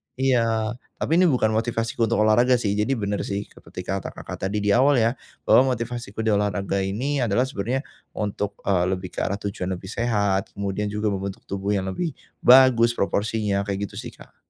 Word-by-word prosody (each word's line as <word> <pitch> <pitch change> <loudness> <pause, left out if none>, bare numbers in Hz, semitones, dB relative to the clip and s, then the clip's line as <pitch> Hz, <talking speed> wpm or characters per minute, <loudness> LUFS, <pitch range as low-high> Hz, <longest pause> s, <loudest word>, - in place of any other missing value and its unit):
iya, 115 -4 +1 0.2
tapi 165 +2 +1
ini 185 - +5
bukan 120 -7 +2
motivasiku 115 +1 0
untuk 110 -1 +2
olahraga 120 +4 +4
sih, 110 -4 0
jadi 105 +6 0
benar 100 -2 -2
sih 100 0 -2
ke - - -17
ketika 95 +2 -4
kata - - -6
Kakak - - -7
tadi 105 +1 -2
di 105 - +2
awal 135 +5 +5
ya, 115 -1 +3 0.3
bahwa 130 0 +5
motivasiku 115 -2 -5
di 110 - +2
olahraga 100 -1 0
ini, 120 +10 -1
adalah 120 0 +2
sebenarnya 130 +2 -2 0.3
untuk, 105 -1 -3
eee, 90 -3 +2
lebih 90 -1 -8
ke - - -6
arah 100 - 0
tujuan 100 -2 -4
lebih 95 +2 -9
sehat, 100 -5 0
kemudian 100 +1 -2
juga 105 0 -1
membentuk 95 0 -5
tubuh 100 +1 -2
yang 95 -1 -2
lebih 160 - -3 0.2
bagus 120 -2 +6
proporsinya, 100 0 0
kayak 100 0 -3
gitu - - -7
sih - - -8
Kak. - - -17
105 Hz, 190 wpm, -24 LUFS, 100-120 Hz, 0.3 s, bagus